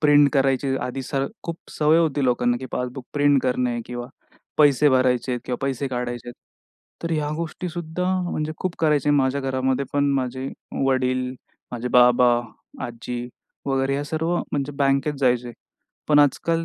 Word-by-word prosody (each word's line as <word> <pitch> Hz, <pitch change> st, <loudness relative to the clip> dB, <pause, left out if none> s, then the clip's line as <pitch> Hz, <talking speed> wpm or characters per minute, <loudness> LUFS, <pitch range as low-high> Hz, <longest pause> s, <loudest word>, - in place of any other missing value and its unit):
Print 145 Hz, -1 st, +6 dB
करायची 135 Hz, 0 st, +2 dB
आधी 130 Hz, +1 st, -4 dB
स 140 Hz, -, -8 dB, 0.3 s
खूप 170 Hz, 0 st, -5 dB
सवय 155 Hz, +2 st, +3 dB
होती 145 Hz, -4 st, +1 dB
लोकांना 120 Hz, -1 st, +2 dB
की 130 Hz, -, -5 dB
पासबुक 125 Hz, 0 st, -4 dB
प्रिंट 145 Hz, -2 st, +3 dB
करणे 125 Hz, -2 st, 0 dB
किंवा 120 Hz, 0 st, -5 dB, 0.5 s
पैसे 145 Hz, 0 st, +5 dB
भरायचेत 125 Hz, -1 st, +2 dB
किंवा 125 Hz, -, -2 dB
पैसे 135 Hz, 0 st, -2 dB
काढायचेत. 120 Hz, -1 st, -4 dB, 0.7 s
तर 165 Hz, -, -3 dB
ह्या 150 Hz, -2 st, 0 dB
गोष्टी 170 Hz, +2 st, -4 dB
सुद्धा 175 Hz, +1 st, -4 dB, 0.3 s
म्हणजे 155 Hz, +1 st, -2 dB
खूप 185 Hz, -2 st, -3 dB
करायचे 150 Hz, -2 st, +2 dB
माझ्या 140 Hz, -1 st, +2 dB
घरामध्ये 130 Hz, 0 st, 0 dB
पण 145 Hz, 0 st, +2 dB
माझे 130 Hz, 0 st, -2 dB, 0.4 s
वडील, 130 Hz, -1 st, +1 dB, 0.4 s
माझे 120 Hz, +1 st, -3 dB
बाबा, 125 Hz, -1 st, +5 dB, 0.4 s
आजी 120 Hz, +1 st, -5 dB, 0.4 s
वगैरे 135 Hz, 0 st, +1 dB
ह्या 145 Hz, +1 st, -2 dB
सर्व 160 Hz, +3 st, -1 dB, 0.2 s
म्हणजे 145 Hz, 0 st, -1 dB
बँकेत 140 Hz, +2 st, +2 dB
जायचे. 125 Hz, -2 st, +1 dB, 0.6 s
पण 150 Hz, -1 st, +5 dB
आजकाल 165 Hz, +4 st, +2 dB
135 Hz, 150 wpm, -23 LUFS, 125-145 Hz, 0.7 s, प्रिंट